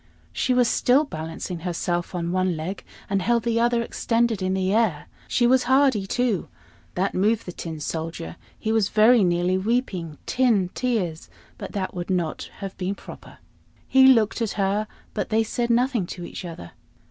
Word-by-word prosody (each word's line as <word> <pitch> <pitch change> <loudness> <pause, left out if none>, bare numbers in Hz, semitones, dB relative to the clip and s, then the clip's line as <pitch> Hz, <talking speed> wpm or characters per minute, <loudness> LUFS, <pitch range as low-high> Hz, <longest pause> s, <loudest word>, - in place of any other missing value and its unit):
She - - 0
was 250 -1 +4
still 255 +5 +3
balancing 165 - -6
herself 175 +1 -2
on 170 -1 -2
one 185 -2 0
leg, 175 +5 -5 0.2
and 195 -1 0
held 235 +3 +1
the 230 -1 +1
other 235 0 +2
extended 230 -2 0
in 185 0 0
the 190 0 0
air. 215 -10 +1 0.2
She 240 - +2
was 255 +1 +4
hardy 260 -6 +3
too. 245 -3 0 0.5
That 190 +2 0
moved 215 +4 +1
the 180 - -5
Tin 165 -2 -6
Soldier; 160 - -5 0.2
he 220 - -2
was 220 -3 +2
very 220 +1 +5
nearly 175 +1 +1
weeping 190 - -1
tin 225 -8 +2
tears, 190 -10 -2 0.3
but - - -7
that 190 -2 -3
would 175 0 -5
not 175 -4 -2
have 195 -1 -5
been 190 +2 -2
proper. - - -12 0.5
He 265 0 +6
looked 230 -3 +4
at 225 - -1
her, 205 +2 0 0.3
but - - -3
they 225 0 +3
said 235 +2 -2
nothing 240 -4 +2
to 175 -1 -7
each 180 - -7
other. 165 - -8
200 Hz, 175 wpm, -24 LUFS, 175-235 Hz, 0.5 s, He